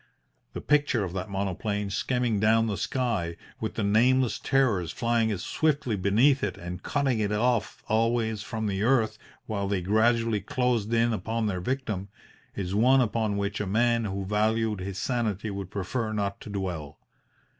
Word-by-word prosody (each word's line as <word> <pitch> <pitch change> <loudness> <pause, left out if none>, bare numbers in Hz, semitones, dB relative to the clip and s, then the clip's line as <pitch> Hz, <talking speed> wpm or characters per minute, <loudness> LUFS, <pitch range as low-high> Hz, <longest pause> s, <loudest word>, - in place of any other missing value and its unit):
The - - -5
picture 145 -7 +2
of 90 -2 -4
that 95 +1 -4
monoplane 100 +1 -2
skimming 120 0 0
down 110 +2 +4
the 105 -3 -1
sky, 105 -10 -1 0.2
with 110 - -4
the 110 - -1
nameless 120 +4 +3
terrors 120 - +1
flying 115 -1 +1
as 95 -3 -3
swiftly 145 -7 0
beneath 110 +9 +3
it 105 - -2
and 90 +1 -6
cutting 135 -3 0
it 105 -1 0
off 115 +1 0
always 110 -1 +1
from 110 0 -4
the 100 -2 -1
earth 115 -1 +2 0.3
while 100 -2 -2
they 95 -2 -1
gradually 110 +2 +2
closed 120 0 0
in 115 0 +3
upon 110 +3 -2
their 95 -4 -1
victim, 105 -4 -3 0.5
is 95 -2 -3
one 125 +6 +5
upon 110 -3 0
which 100 +1 -2
a 105 - -3
man 115 +3 +2
who 100 -1 -3
valued 110 +1 +1
his 95 +1 -5
sanity 110 -4 -1
would 100 -2 -5
prefer 110 +4 -3
not 100 -2 -2
to - - -9
dwell. 90 -7 -4
110 Hz, 165 wpm, -27 LUFS, 100-120 Hz, 0.5 s, one